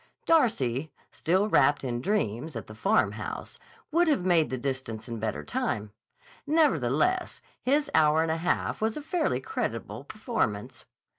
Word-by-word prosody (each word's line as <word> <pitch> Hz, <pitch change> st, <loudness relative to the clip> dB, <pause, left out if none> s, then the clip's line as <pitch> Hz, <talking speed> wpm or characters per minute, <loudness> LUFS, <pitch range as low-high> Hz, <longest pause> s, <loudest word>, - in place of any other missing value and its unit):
Darcy, 155 Hz, -, +2 dB, 0.2 s
still 190 Hz, +5 st, +1 dB
wrapped 145 Hz, -8 st, +3 dB
in 120 Hz, -2 st, -2 dB
dreams 155 Hz, -, -1 dB
at 115 Hz, -, -5 dB
the 110 Hz, -, -11 dB
Farmhouse, 200 Hz, -, -1 dB, 0.3 s
would 340 Hz, +2 st, +3 dB
have 245 Hz, -, +2 dB
made 170 Hz, -4 st, +3 dB
the 130 Hz, -, -2 dB
distance 125 Hz, -4 st, -4 dB
in 115 Hz, -2 st, -5 dB
better 105 Hz, -9 st, -3 dB
time; 105 Hz, +7 st, -2 dB, 0.6 s
nevertheless, 300 Hz, -, +2 dB, 0.2 s
his 285 Hz, +3 st, +1 dB
hour 155 Hz, +1 st, +4 dB
and 165 Hz, -, 0 dB
a 160 Hz, -, 0 dB
half 175 Hz, +5 st, -1 dB
was 220 Hz, +3 st, 0 dB
a -, -, -4 dB
fairly 330 Hz, +1 st, 0 dB
creditable 440 Hz, -1 st, -4 dB
performance. -, -, -3 dB
160 Hz, 145 wpm, -28 LUFS, -, 0.6 s, hour